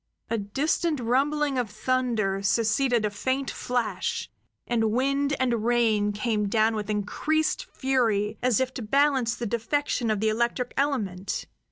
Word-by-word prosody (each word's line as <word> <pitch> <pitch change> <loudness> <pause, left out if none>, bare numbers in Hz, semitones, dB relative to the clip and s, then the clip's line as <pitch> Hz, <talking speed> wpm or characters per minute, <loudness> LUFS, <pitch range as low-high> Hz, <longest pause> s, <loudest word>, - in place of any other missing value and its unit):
A 230 - +1
distant 295 +9 0
rumbling 275 +3 +1
of 240 -4 -2
thunder 220 -3 0
succeeded 230 +3 +2
a 210 - -1
faint 260 +6 -1
flash, 245 -2 -2 0.3
and 225 -2 +1
wind 275 +4 +1
and 240 -4 +1
rain 225 -3 +2
came 210 0 -1
down 220 +1 +3
with 210 -1 -4
increased 300 +10 0
fury 225 -5 0
as 250 -4 +2
if 260 0 -1
to 260 - -5
balance 260 0 +2
the 240 - -4
defection 235 +2 -1
of 215 -2 +1
the 220 +1 +2
electric 235 +3 -1
element. 200 -10 -1
235 Hz, 145 wpm, -26 LUFS, 215-265 Hz, 0.3 s, down